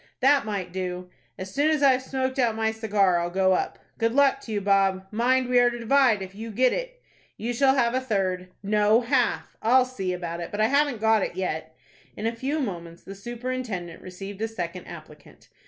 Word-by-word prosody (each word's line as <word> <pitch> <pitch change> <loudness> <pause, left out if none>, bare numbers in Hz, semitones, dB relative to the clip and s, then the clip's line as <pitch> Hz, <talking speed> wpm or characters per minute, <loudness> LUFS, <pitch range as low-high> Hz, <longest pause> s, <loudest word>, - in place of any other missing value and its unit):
"That 275 -1 +4
might 195 -4 -3
do." 180 -1 -4 0.3
"As 190 +1 -7
soon 290 +2 +2
as 305 -2 +1
I've 265 -2 +5
smoked 260 0 -3
out 235 -3 +2
my 220 0 0
cigar, 205 -5 +2
I'll 170 0 -2
go 190 +1 +2
up." - - -1 0.2
"Good 230 0 +1
luck 280 0 +3
to 225 - -9
you, 210 - 0
Bob. 195 -1 +2
Mind 250 +3 +2
we 250 0 +4
are 245 0 +5
to 240 - -5
divide 240 -3 +3
if 190 0 -9
you 220 +3 -7
get 250 +4 +2
it." - - -5 0.3
"You 235 +2 -3
shall 265 +2 +3
have 235 -3 +2
a 260 - +1
third." 190 -6 -1 0.2
"No, 210 +3 +3
half." 245 0 0
"I'll 250 +3 +4
see 195 -8 -4
about 175 -1 -4
it; 170 - -5
but 205 - -6
I 215 +1 +3
haven't 280 -4 +1
got 220 -1 +4
it 175 - -3
yet." 160 -4 -4 0.4
In 210 - -4
a 230 +1 -1
few 270 +6 -2
moments 170 - -5
the 195 - -9
superintendent 230 -5 -5
received 195 +2 -8
a 225 - 0
second 180 -5 -6
applicant. - - -13
220 Hz, 210 wpm, -25 LUFS, 190-255 Hz, 0.4 s, I've